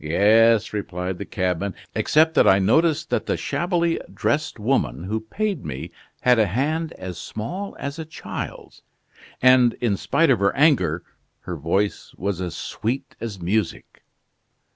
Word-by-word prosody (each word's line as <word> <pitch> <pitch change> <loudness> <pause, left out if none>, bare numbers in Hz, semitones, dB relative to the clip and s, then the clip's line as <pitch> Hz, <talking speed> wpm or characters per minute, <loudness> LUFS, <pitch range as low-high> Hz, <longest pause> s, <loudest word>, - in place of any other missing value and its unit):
"Yes," 110 +7 +4
replied 90 -3 -4
the 100 - -4
cabman, 95 0 -2 0.2
"except 160 +1 +3
that - - +5
I 95 - +7
noticed 155 - +2
that - - 0
the - - 0
shabbily 170 -1 0
dressed 150 -1 -1
woman 110 -5 0
who 105 +4 -2
paid 195 - -3
me 65 -3 -6 0.3
had 125 -2 +4
a 110 - +4
hand 155 - -1
as 90 -2 -7
small 180 - -5
as 140 +3 -5
a 160 - -4
child's, 155 -1 -7 0.6
and 130 -2 +6
in 115 -5 0
spite 165 - +2
of 120 - +3
her 100 0 +2
anger, 95 - +3 0.4
her 90 - -5
voice 85 +7 -1
was 95 -1 -2
as 90 -2 -4
sweet 130 +10 -4
as 110 -4 -5
music." 100 +5 -2
110 Hz, 150 wpm, -23 LUFS, 95-150 Hz, 0.6 s, I